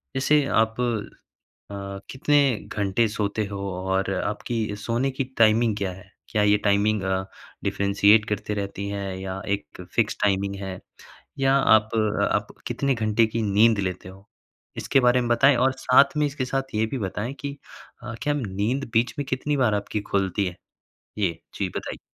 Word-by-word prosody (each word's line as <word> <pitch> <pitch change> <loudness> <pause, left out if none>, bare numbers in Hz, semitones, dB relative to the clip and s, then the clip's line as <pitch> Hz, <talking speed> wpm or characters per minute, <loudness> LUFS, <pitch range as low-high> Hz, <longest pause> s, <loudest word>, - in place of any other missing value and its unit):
जैसे 145 +2 +3 0.2
आप 110 +2 -5 0.9
अ, - - -6 0.4
कितने 145 +2 +2 0.4
घंटे 105 +3 +2
सोते 105 0 -2
हो 100 - -4 0.2
और 95 +1 0
आपकी 105 +2 -2
सोने 115 +5 -1
की 135 +1 -2
टाइमिंग 115 0 +4
क्या 100 -2 -2
है? 95 +1 -14 0.2
क्या 105 -2 +1
ये 105 0 +4
टाइमिंग 100 0 +2
अ, 95 0 0 0.4
डिफ़रेंशिएट 100 +2 +4
करते 105 0 -2
रहती 100 0 -4
है 100 -2 -4
या 95 0 -5
एक 85 -1 -13
फ़िक्स 110 -3 +1
टाइमिंग 100 0 +1
है? 95 -1 -5 0.6
या 135 0 +3
आप 110 -5 +4 0.4
आप 105 0 0 0.2
कितने 135 +3 0
घंटे 110 0 +2
की 110 +1 -3
नींद 105 +2 +4
लेते 90 -1 -4
हो? 95 +2 -16 0.5
इसके 135 - +2
बारे 125 0 +4
में 120 - -2
बताएँ 130 +3 +5
और 130 +2 +3
साथ 140 +2 +4
में 150 - +3
इसके 140 -2 -3
साथ 135 0 -3
ये 110 - +2
भी 130 +4 -4
बताएँ 105 +4 -3
कि 140 0 -5 0.5
अ, 120 -2 -6
क्या 145 0 +1
नींद 115 +2 -2
बीच 115 0 +2
में 145 - -2
कितनी 145 +3 -1
बार 120 -5 +3
आपकी 105 +1 -2
खुलती 95 0 +1
है? 90 -1 -5 0.6
ये 90 -5 0 0.2
जी - - 0
बताइए। - - -5
110 Hz, 170 wpm, -24 LUFS, 100-125 Hz, 0.9 s, बताएँ